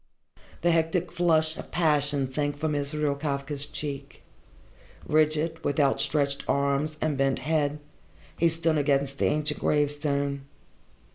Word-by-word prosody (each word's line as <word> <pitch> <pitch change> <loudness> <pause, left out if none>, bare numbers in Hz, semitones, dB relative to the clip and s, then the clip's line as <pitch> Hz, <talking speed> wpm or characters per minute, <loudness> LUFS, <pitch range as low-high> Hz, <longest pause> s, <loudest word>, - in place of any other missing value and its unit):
The 175 - +4
hectic 165 +1 +1
flush 160 -2 +2
of - - -8
passion 145 -5 +1
sank 145 0 -1
from 155 +1 -1
Israel 145 0 0
Kafka's 140 0 -2
cheek. 140 -3 -6 0.8
Rigid, 155 +1 +1
with 145 +1 -1
outstretched 140 0 +1
arms 140 +2 0
and 155 -2 0
bent 135 -1 +2
head, 150 -2 0 0.6
he 170 - +3
stood 165 -1 +1
against 140 -1 0
the - - +2
ancient 150 0 0
gravestone. 145 -2 0
150 Hz, 125 wpm, -27 LUFS, 140-155 Hz, 0.8 s, The